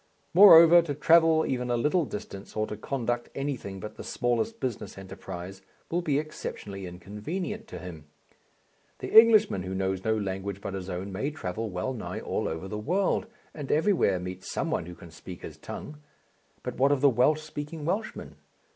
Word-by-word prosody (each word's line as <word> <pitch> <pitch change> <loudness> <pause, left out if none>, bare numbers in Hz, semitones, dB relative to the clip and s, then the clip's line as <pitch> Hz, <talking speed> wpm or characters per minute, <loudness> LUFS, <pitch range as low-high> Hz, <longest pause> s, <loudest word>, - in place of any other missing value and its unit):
Moreover, 170 -2 +9
to 150 -4 -4
travel 160 +2 +5
even 125 -1 -2
a 120 - +1
little 150 +7 +2
distance 100 -4 -8
or 110 - 0
to 105 - -6
conduct 120 +1 -3
anything 130 -9 -4
but 105 - -8
the - - -7
smallest 120 - -1
business 125 -6 -4
enterprise 95 0 -8 0.3
will 175 +2 +1
be 150 -5 +1
exceptionally 100 -10 -5
inconvenient 150 - -5
to - - -8
him. 85 -5 -9 0.9
The - - -6
Englishman 220 - +7
who 95 +1 -5
knows 95 0 -1
no 110 0 +1
language 95 -1 -4
but 100 -1 -6
his 95 -1 -5
own 95 +2 -4
may 105 +10 -2
travel 110 - -4
well 90 +8 -3
nigh 115 - -5
all - - -2
over 80 +4 -4
the 105 +1 -5
world 190 - 0 0.3
and 145 -3 -5
everywhere 155 - +2
meet 90 +1 -7
some - - -3
one - - -1
who 90 - -8
can 85 -1 -13
speak 85 +2 -10
his - - -8
tongue. 150 0 -8 0.6
But - - -5
what 135 +2 +4
of 140 -2 +1
the 145 - +6
Welsh 130 +6 +3
speaking 150 0 -6
Welshman? 205 +6 -3
120 Hz, 180 wpm, -28 LUFS, 95-155 Hz, 0.9 s, Moreover